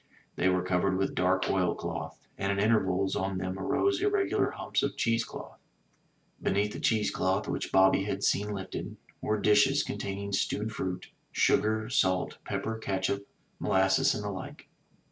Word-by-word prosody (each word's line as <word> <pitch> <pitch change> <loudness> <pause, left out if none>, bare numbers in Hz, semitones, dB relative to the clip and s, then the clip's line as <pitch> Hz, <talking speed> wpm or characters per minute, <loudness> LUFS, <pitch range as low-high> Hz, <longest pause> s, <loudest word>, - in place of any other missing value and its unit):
They 95 - +2
were 90 -1 +1
covered 95 +1 +1
with 95 - 0
dark - - +1
oil - - +1
cloth, - - -5 0.2
and 100 +1 -1
at 100 - -1
intervals 95 -3 +2
on 95 0 -1
them 95 +1 -3
arose 375 - +1
irregular 410 -1 +1
himips - - -1
of - - -2
cheese 115 0 +2
cloth. - - -10 0.8
Beneath 105 +2 +1
the - - -6
cheese 110 -2 +2
cloth, - - 0
which - - -3
Bobby 95 +1 +4
had 105 - -3
seen 105 +1 +1
lifted, 95 -2 -5 0.2
were 110 0 0
dishes 105 0 +4
containing 100 0 -4
stewed 105 +2 -1
fruit, 95 -4 -4 0.2
sugar, 110 +1 +2
salt, 95 -6 +1
pepper, 110 0 -3
catsup, 100 -1 -1 0.4
molasses 95 0 +3
and 105 - -4
the 105 - -3
like. 95 -1 -8
100 Hz, 160 wpm, -29 LUFS, 95-110 Hz, 0.8 s, Bobby